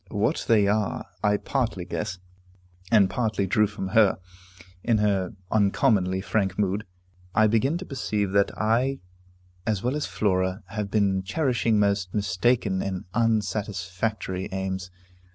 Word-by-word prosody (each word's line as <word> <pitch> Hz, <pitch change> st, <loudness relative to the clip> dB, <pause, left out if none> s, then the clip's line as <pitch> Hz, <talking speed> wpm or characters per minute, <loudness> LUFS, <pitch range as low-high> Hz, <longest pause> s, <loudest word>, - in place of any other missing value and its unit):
What -, -, 0 dB
they 105 Hz, -3 st, +4 dB
are, 105 Hz, 0 st, 0 dB, 0.2 s
I 105 Hz, -1 st, +3 dB
partly 115 Hz, -8 st, -2 dB
guess, 100 Hz, -1 st, -4 dB, 0.7 s
and 105 Hz, -4 st, +6 dB
partly 110 Hz, -2 st, -1 dB
drew 105 Hz, +3 st, +3 dB
from 100 Hz, -2 st, -5 dB
her, 105 Hz, 0 st, +4 dB, 0.7 s
in 115 Hz, -2 st, +3 dB
her 100 Hz, -1 st, 0 dB, 0.2 s
uncommonly 100 Hz, -3 st, +2 dB
frank 95 Hz, 0 st, -1 dB
mood. 100 Hz, +1 st, 0 dB, 0.5 s
I 110 Hz, -, +5 dB
begin 115 Hz, +9 st, +2 dB
to 185 Hz, -, -7 dB
perceive 105 Hz, -, -2 dB
that 100 Hz, 0 st, +3 dB
I, 120 Hz, +5 st, +1 dB, 0.7 s
as 105 Hz, -4 st, 0 dB
well 125 Hz, +3 st, 0 dB
as 150 Hz, -, -2 dB
Flora, 95 Hz, -1 st, 0 dB
have 105 Hz, -2 st, -3 dB
been 100 Hz, -2 st, +2 dB
cherishing 120 Hz, -, +1 dB
most 100 Hz, -2 st, +1 dB
mistaken 100 Hz, 0 st, +1 dB
and 95 Hz, -2 st, -4 dB
unsatisfactory 105 Hz, -3 st, -1 dB
aims. 95 Hz, -1 st, -3 dB
105 Hz, 135 wpm, -25 LUFS, 95-110 Hz, 0.7 s, and